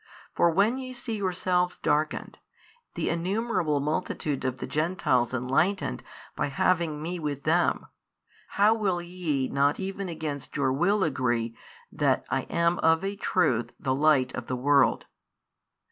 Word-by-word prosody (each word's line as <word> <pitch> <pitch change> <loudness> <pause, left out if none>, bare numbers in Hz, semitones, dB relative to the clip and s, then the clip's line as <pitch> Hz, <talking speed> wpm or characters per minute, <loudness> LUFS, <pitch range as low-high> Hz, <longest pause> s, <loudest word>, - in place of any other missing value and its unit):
For 170 - +3
when 205 +9 +2
ye 255 -1 -6
see 240 -2 -4
yourselves 180 -2 0
darkened, 150 +1 -1 0.6
the - - -1
innumerable 175 -3 0
multitude 150 -1 -2
of 130 0 -2
the - - -5
Gentiles 150 -6 0
enlightened 130 - 0 0.3
by - - -1
having 155 +1 0
Me 175 +2 -3
with 145 -3 -4
them, 170 +3 +2 0.7
how 205 +2 +6
will 200 -5 0
ye 170 -6 -2
not 140 +1 +1
even 195 0 -4
against 155 -4 -5
your 135 -2 +1
will 190 +8 +2
agree 120 -6 0 0.4
that - - +1
I - - -1
am 170 +1 +1
of 160 +2 +3
a 195 +1 -2
truth 155 - 0
the 130 - 0
light 140 -2 +3
of 130 - -6
the 130 - -2
world? 140 +2 +3
160 Hz, 145 wpm, -27 LUFS, 140-185 Hz, 0.7 s, how